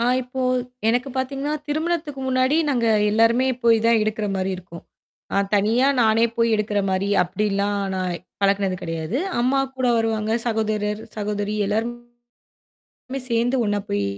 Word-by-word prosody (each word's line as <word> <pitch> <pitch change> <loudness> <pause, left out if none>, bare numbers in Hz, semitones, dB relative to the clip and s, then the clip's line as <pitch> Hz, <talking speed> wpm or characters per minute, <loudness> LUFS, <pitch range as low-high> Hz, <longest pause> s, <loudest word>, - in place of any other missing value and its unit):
ஆ - - +1 0.2
இப்போ 255 +1 -5 0.5
எனக்குப் 250 +3 0
பாத்தீங்கன்னா, 275 +3 -2
திருமணத்துக்கு 310 -2 -2
முன்னாடி 255 +3 +2
நாங்க 245 -5 +1 0.2
எல்லாருமே 230 +4 +3 0.2
போய் 230 -1 +6
தான் 230 -1 +5
எடுக்குறமாரி 205 -3 -1
இருக்கும். 170 -2 -11 0.5
அ - - +1 0.2
தனியா 220 +6 +3
நானே 225 0 +4
போய் 230 0 +3
எடுக்குற 210 -1 0
மாரி, 190 +1 0
அப்பிடில்லாம் 200 +2 -1 0.2
நான் 180 -2 -2 0.2
பழக்குனது 195 -1 +1
கிடையாது. 165 +7 -3 0.2
அம்மாகூட 265 +1 0
வருவாங்க. 220 -1 0
சகோதரர், 215 -2 -1 0.2
சகோதரி 210 0 -2
எல்லாருமே 240 +3 -4 1.0
சேந்து 235 +3 +1
ஒண்ணா 205 0 0
போய் 100 0 0
225 Hz, 125 wpm, -22 LUFS, 205-250 Hz, 1.0 s, போய்